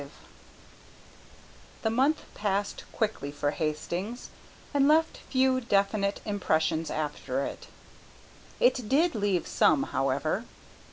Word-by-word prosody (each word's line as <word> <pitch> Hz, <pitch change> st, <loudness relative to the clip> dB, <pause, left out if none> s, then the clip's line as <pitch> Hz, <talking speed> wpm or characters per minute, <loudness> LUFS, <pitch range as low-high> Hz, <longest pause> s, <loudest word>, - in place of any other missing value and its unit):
V -, -, -12 dB, 1.7 s
The 220 Hz, -, +1 dB
month 275 Hz, +6 st, +2 dB
passed 205 Hz, -1 st, -2 dB
quickly 210 Hz, -10 st, -2 dB
for 145 Hz, 0 st, -1 dB
Hastings, 170 Hz, +9 st, -3 dB, 0.4 s
and 280 Hz, -1 st, +4 dB
left 320 Hz, +2 st, +3 dB
few 260 Hz, -1 st, +1 dB
definite 200 Hz, -2 st, +1 dB
impressions 160 Hz, -6 st, 0 dB
after 145 Hz, -3 st, -2 dB
it. -, -, -7 dB, 0.9 s
It 260 Hz, -, +2 dB
did 320 Hz, +5 st, +3 dB
leave 200 Hz, -5 st, 0 dB
some, 145 Hz, -3 st, +3 dB
however. 135 Hz, -, 0 dB
200 Hz, 105 wpm, -28 LUFS, 155-255 Hz, 1.7 s, and